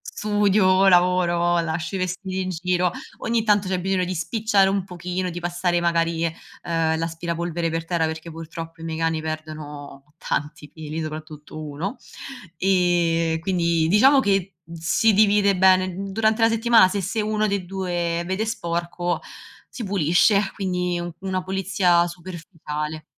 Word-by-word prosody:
studio, 200 -2 +3
lavoro, 175 -1 +3
lascio 165 +2 -3
i - - 0
vestiti 185 +1 -3
in 185 - -3
giro, 180 0 0 0.3
ogni 230 -1 0
tanto 205 -2 +2
c'è 185 -1 -1
bisogno 190 0 0
di 185 - -3
spicciare 200 +2 +2
un 195 -1 0
pochino, 180 0 -4
di 175 - -5
passare 175 0 -1
magari, 170 -1 +1
uhm, 165 -1 -2
l'aspirapolvere 170 +1 -3
per 165 0 -3
terra 165 -1 0
perché 160 +1 -5
purtroppo 165 0 -8
i - - -8
miei 160 -1 -4
cani 165 -1 0
perdono 150 -2 -7
tanti 150 0 -4
peli, 155 0 -6
soprattutto 155 -1 -8
1 155 - -5 0.6
ehm, 170 -3 +2
quindi 170 -2 +1
diciamo 260 - +5
che 195 -5 0 0.2
si 170 +7 +2
divide 200 -1 +4
bene. 185 0 +4 0.2
Durante 220 +2 +1
la 225 - +6
settimana 225 -3 +5
se 200 +1 -2
se 195 +5 -3
1 215 0 0
dei 200 -3 -2
2 175 -2 -2
vede 190 +4 -1
sporco 175 -4 -2 0.5
si 240 - -7
pulisce, 195 +2 +2
quindi 180 -2 -2 0.2
una 190 -1 -2
pulizia 190 -2 +2
superficiale. 165 -3 -6
175 Hz, 140 wpm, -23 LUFS, 165-195 Hz, 0.6 s, la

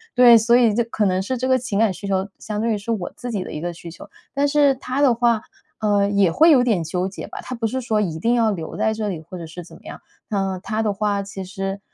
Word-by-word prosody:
对， 245 -2 +8
所 230 +2 +3
以 240 -3 +4
这 235 - +1
可 225 -2 -2
能 185 -1 +1
是 255 +7 -3
这 255 +2 -2
个 260 - +4
情 250 -5 -3
感 220 -1 +3
需 200 +3 -8
求 190 0 -1
相 210 -1 -4
对 230 0 +1
于 - - -1
是 200 +3 -10
我 190 -5 -4
自 245 - -6
己 200 -5 -2
的 - - -8
一 150 - -5
个 175 +2 -4
需 170 0 -10
求。 - - -12 0.2
但 280 +1 +1
是 285 -1 +4
他 260 +1 -3
的 275 -4 +5
话， 235 -1 +2 0.4
呃， 205 -2 +2
也 200 -3 +3
会 320 - +5
有 270 -5 +6
点 215 -9 +1
纠 180 +3 -2
结 195 - -7
吧， - - -9
他 255 - -6
不 230 -1 -3
是 255 +4 -1
说 225 -4 0
一 165 -6 -3
定 230 +8 +1
要 225 -2 +2
留 165 -5 -5
在 220 - +1
这 215 -1 -3
里， 175 -6 -4
或 170 +3 -10
者 170 - -7
是 165 +2 -9
怎 170 - -14
么 - - -23
样， - - -9 0.3
那 195 -3 -2
他 220 +2 -2
的 215 - +1
话 200 0 -1
其 195 -1 -7
实， 195 +1 -4
210 Hz, 305 characters per minute, -21 LUFS, 190-235 Hz, 0.4 s, 对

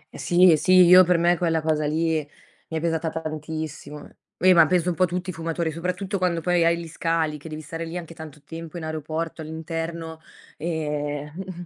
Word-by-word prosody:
Eh - - -9
sì, 180 +1 +5
eh 155 - +5
sì, 185 - +2
io 180 +1 +9
per 180 0 +2
me 170 +1 +3
quella 165 -2 +1
cosa 155 -1 0
lì 160 +1 0 0.5
mi 160 - -4
è - - -1
pesata 165 0 -1
tantissimo. 155 -2 -6 0.3
Eh, 185 +1 +5
ma 165 -2 +6
penso 180 0 +1
un - - 0
po' 185 +2 +3
tutti 180 +1 -3
i - - -11
fumatori, 165 0 -2
soprattutto 180 +4 -3
quando 180 -2 0
poi 175 0 +2
hai 170 0 +3
gli 170 - -7
scali, 160 -2 -1
che 160 - -10
devi 155 0 -6
stare 165 +2 -6
lì 165 +2 -5
anche 165 -1 -8
tanto 155 -3 -11
tempo 165 +1 -8
in 165 - -6
aeroporto 160 +1 -4
all'interno 165 +1 -5 0.4
ehm 150 -2 -3
mh-mh 180 -1 -7
165 Hz, 205 wpm, -24 LUFS, 155-175 Hz, 0.5 s, io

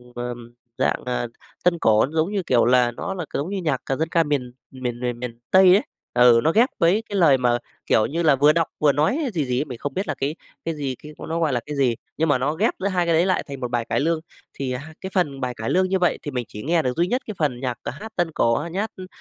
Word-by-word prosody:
ờm, 120 -1 -6 0.2
dạng, - - 0
à, 125 -1 -1 0.4
tân 175 -1 +2
cổ 110 0 +4
giống 160 +5 +1
như, 195 -3 -1
kiểu 120 -7 +3
là, 125 -1 +4
nó 195 - -5
là 175 -4 -4
c - - -29
giống 150 +6 -2
như 200 - -3
nhạc 145 -6 0
c 135 +2 -2
dân 160 0 0
ca 165 -1 +3
miền 140 -5 -2 0.2
miền 125 -2 -4
miền 120 -1 -3
miền 120 -1 -6
Tây 190 -1 +7
ấy, 205 - +2 0.3
ừ, 120 -1 +6
nó 160 - +3
ghép 235 +7 +4
với 190 +7 +3
cái 205 - -4
lời 150 -7 +5
mà 120 -1 +2 0.3
kiểu 110 - +3
như 170 +3 -2
là 150 -4 +5
vừa 145 +3 +5
đọc 165 -1 +1
vừa 150 -2 +5
nói 155 - +1 0.2
gì 155 -5 0
gì 125 0 0
ấy, 150 - -1
mình 125 -4 -7
không 140 +2 -4
biết 195 +2 -2
là - - -2
cái 145 +4 -2 0.3
cái 165 -1 -2
gì, 135 -3 -3
cái 150 - -9 0.2
nó 165 +1 -1
gọi 155 -5 +1
là 120 - +1
cái 150 0 -5
gì, 130 -4 +2 0.2
nhưng 160 0 +1
mà 135 - +4
nó 140 +4 0
ghép 205 +8 +1
giữa 200 - 0
hai 180 -3 +1
cái 170 - +2
đấy 170 +3 +4
lại 185 - +1
thành 140 -1 -7
một 125 -1 -4
bài 120 -1 0
cải - - +1
lương. 165 +2 +1 0.3
Thì, 135 -2 -3
à, 125 - -2
hai 160 +3 -11
cái 190 - -5
phần 145 -7 0
bài 125 -1 -2
cải 115 -1 -4
lương 185 0 +2
như 190 -1 +1
vậy 180 - +2
thì 145 - -5
mình 125 -2 -3
chỉ 105 - -9
nghe 165 +2 +2
được 125 0 -2
duy 175 +1 +2
nhất 250 +5 0
cái 215 - -4
phần 140 -6 0
nhạc, 125 -2 -3
ờ, - - -3
hát 220 +1 -8
tân 175 -2 0
cổ, 115 -5 +2
ờ, 160 +7 -2
nhát, 200 +5 -2
ưm, 185 -1 -9
145 Hz, 295 wpm, -23 LUFS, 125-170 Hz, 0.4 s, Tây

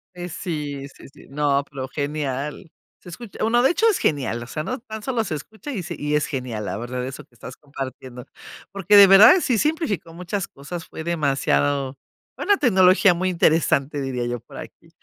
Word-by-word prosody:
Pues 175 -1 -7
sí, 145 -5 -5
sí, - - -14
sí, - - -17
no, 140 0 +1
pero 135 -2 -6
genial, 145 +3 -4 0.3
se - - -13
escucha, 225 +4 -10
bueno, 235 +2 +3
de 265 - +4
hecho 445 - +1
es 425 - +1
genial, 130 -5 -1
o 120 - -8
sea, 155 +5 -4
no 255 - -4
tan 220 -3 -9
solo 245 -3 -1
se 170 -7 -4
escucha 220 - -9
y 205 -9 -4
se 170 +1 -6
y 150 0 -1
es 150 - +1
genial, 125 -6 -4
la - - -4
verdad, 125 +2 -4
eso 130 +1 -7
que 120 - -29
estás 125 +2 -10
compartiendo. 130 -3 -8 0.5
Porque 195 +1 +2
de 200 -1 +11
verdad, 195 - +9
si 250 -7 +1
simplificó 215 - -1
muchas 180 +3 -4
cosas, 165 +5 -8
fue 160 - -8
demasiado 140 -3 0 0.4
una 405 -1 +2
tecnología 190 - +5
muy 185 +2 -1
interesante, 155 -4 +1
diría 130 -3 -3
yo 120 0 -3
por - - -14
aquí. - - -12
155 Hz, 195 wpm, -22 LUFS, 135-195 Hz, 0.5 s, de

